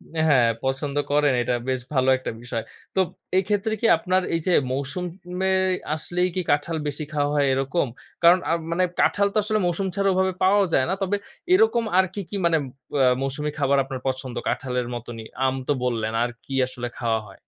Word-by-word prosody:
অ্যা 160 - +1
হ্যাঁ, 125 -5 +5
পছন্দ 135 +2 -2 0.2
করেন 145 -1 +3
এটা 125 - 0
বেশ 130 -1 0
ভালো 130 -1 +3
একটা 130 - -5
বিষয়। 120 -2 -4 0.3
তোপ 190 -2 +3 0.3
এই 190 - +4
ক্ষেত্রে 210 +1 0
কি - - 0
আপনার 185 0 +1
এই 165 - +2
যে 180 - +3 0.2
মৌসুম 140 +6 -3 0.4
মে 190 - +2 0.5
আসলেই 180 +3 -1
কি 185 - +1
কাঁঠাল 150 +3 0
বেশি 145 +1 -4
খাওয়া 145 -1 +1
হয় 145 -1 +3
এরকম? 135 +4 0 0.4
কারণ 175 +2 +7
আ - - +2 0.2
মানে 175 +2 +2 0.2
কাঁঠাল 200 0 +3
তো - - 0
আসলে 215 0 0
মৌসুম 175 +3 0
ছাড়া 195 -1 +2
ওভাবে 190 0 +1
পাওয়াও 200 +1 +5
যায় 130 - +4
না। 190 - +1
তবে 195 +1 +1 0.4
এরকম 370 - +4
আর 190 - +6
কি, 205 - -5
কি - - -5
মানে 165 -1 +4 0.4
অ্যা 135 -2 +4
মৌসুমি 145 +3 -2
খাবার 140 +1 +3
আপনার 135 -1 -6
পছন্দ 130 -1 -3
কাঁঠালের 125 -2 -1
মতনই? 115 -1 -7 0.2
আম 130 0 +1
তো - - +2
বললেন 115 -3 -1
আর 120 - 0 0.2
কি 135 - -7
আসলে 125 -1 -5
খাওয়া 115 -2 0
হয়? 95 - -15
145 Hz, 200 wpm, -24 LUFS, 130-185 Hz, 0.5 s, কারণ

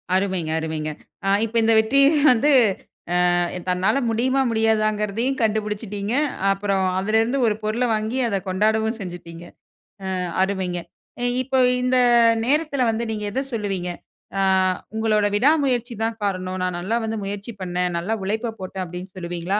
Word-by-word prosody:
அருமைங்க 185 -4 0
அருமைங்க. 155 -1 -3 0.3
ஆ - - +2 0.2
இப்ப 225 +1 -9
இந்த 225 0 +4
வெற்றி 220 +5 +2 0.3
வந்து 250 +5 +3 0.8
அ - - +2 0.3
தன்னால 190 +8 +1
முடியுமா 255 +4 +1
முடியாதாங்கிறதையும் 220 +2 0
கண்டுபிடிச்சுட்டீங்க. 210 -1 -2 0.4
அப்புறம் 195 -1 0
அதிலேருந்து 225 +6 +1
ஒரு 215 - +2
பொருள 220 +4 0
வாங்கி 220 +4 -2
அத 200 -3 0
கொண்டாடவும் 220 +4 +1
செஞ்சுட்டீங்க. 175 -2 -8 0.7
அ - - -1 0.3
அருமைங்க. 190 -3 -2 0.6
இப்ப 265 +1 -3 0.3
இந்த 255 0 +2 0.5
நேரத்தில 290 +1 +1
வந்து 225 +1 -2
நீங்க 215 -1 -4
எத 265 +6 -1
சொல்லுவீங்க? 195 -5 -2 0.5
அ - - +2 0.5
உங்களோட 215 -2 +2
விடா 255 +8 +4
முயற்சி 245 -2 -1
தான் 225 0 -2
காரணம். 185 -2 -2
நான் 180 -1 -2
நல்லா 195 +6 -1
வந்து 220 0 -3
முயற்சி 205 +3 -5
பண்ணேன். 180 -1 -1
நல்லா 210 +6 -2
உழைப்ப 220 +4 -2
போட்டேன். 185 0 -5
அப்படின்னு 180 +2 -8
சொல்லுவீங்களா? 175 +2 -2
210 Hz, 140 wpm, -22 LUFS, 185-225 Hz, 0.8 s, இந்த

